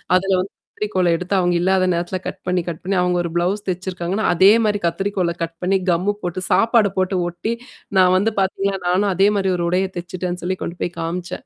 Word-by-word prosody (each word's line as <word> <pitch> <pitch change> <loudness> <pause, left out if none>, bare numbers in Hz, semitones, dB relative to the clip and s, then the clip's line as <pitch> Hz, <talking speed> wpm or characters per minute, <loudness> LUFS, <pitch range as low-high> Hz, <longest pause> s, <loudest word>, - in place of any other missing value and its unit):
அதுல 195 +1 +2
வந்து 190 - -6 0.3
கத்திரிக்கோல்ல 185 -5 +1
எடுத்து 180 +3 -4
அவங்க 175 -1 +2
இல்லாத 185 +1 +2
நேரத்தில 175 +2 -2
கட் 190 - -6
பண்ணி, 180 -1 +1
கட் 165 -2 -4
பண்ணி 195 +1 -1
அவங்க 180 0 +1
ஒரு 170 - -3
ப்ளவுஸ் 190 +5 0
தச்சிருக்காங்கன்னா, 185 +2 -2
அதே 190 +4 +6
மாரி 205 -1 +1
கத்திரிக்கோல 185 0 -1
கட் 165 0 -5
பண்ணி 190 +2 +2
கம்மு 180 +4 +1
போட்டு 175 +1 -3
சாப்பாடு 225 -3 +4
போட்டு 185 0 +1
ஒட்டி, 175 +7 -3 0.4
நான் 185 -1 +5
வந்து 215 +3 +1
பாத்தீங்களா 195 0 0
நானும் 190 +3 +2
அதே 195 +2 +4
மாரி 190 -1 +1
ஒரு 170 - -1
உடைய 185 +2 +1
தச்சுட்டேன்னு 180 0 -4
சொல்லி 185 +1 -1
கொண்டு 175 0 -3
காமிச்சேன். 170 +2 -4
185 Hz, 195 wpm, -20 LUFS, 175-195 Hz, 0.4 s, அதே